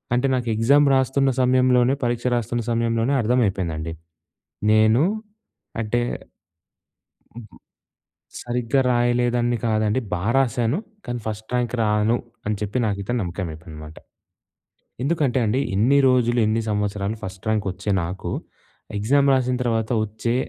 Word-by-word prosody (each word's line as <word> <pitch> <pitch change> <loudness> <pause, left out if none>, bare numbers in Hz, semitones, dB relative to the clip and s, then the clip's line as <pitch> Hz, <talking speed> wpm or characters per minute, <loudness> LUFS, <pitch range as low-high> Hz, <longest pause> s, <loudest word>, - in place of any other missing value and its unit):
అంటే 125 +3 +1
నాకు 125 -2 -2
ఎగ్జామ్ 140 +6 +4
రాస్తున్న 135 +1 +2
సమయంలోనే 125 0 +3
పరీక్ష 120 0 -1
రాస్తున్న 120 0 -2
సమయంలోనే 115 +2 +1
అర్థమైపోయిందండి. 95 -9 0 0.8
నేను 110 +4 +4 0.8
అంటే 115 +2 0 1.3
హుహు. 110 -5 -12 0.9
సరిగ్గా 120 +2 0
రాయలేదన్ని 120 0 +1
కాదండి 110 +1 +1
బా 90 0 -2
రాసాను. 120 +1 +1 0.3
కానీ 120 -1 -4
ఫస్ట్ 110 0 -5
ర్యాంక్ 120 -1 0
రాను 105 +2 +2 0.3
అని 105 +1 0
చెప్పి 105 +3 -2
నాకైతే 100 +1 -2
నమ్మకమైపోయిందనమాట. 80 -4 -6 1.1
ఎందుకంటే 140 -3 +1
అండి 110 +5 +1
ఇన్ని 120 +8 +4
రోజులు, 125 -1 +2
ఇన్ని 110 +1 +1
సంవత్సరాలు 105 0 -2
ఫస్ట్ 95 -2 -8
ర్యాంకొచ్చే 100 -2 -1
నాకు 90 +3 -5 0.7
ఎగ్జామ్ 140 +7 +3
రాసిన 125 -1 +1
తర్వాత 115 -2 -1
ఒచ్చే 110 +3 -3
115 Hz, 110 wpm, -22 LUFS, 105-125 Hz, 1.3 s, ఎగ్జామ్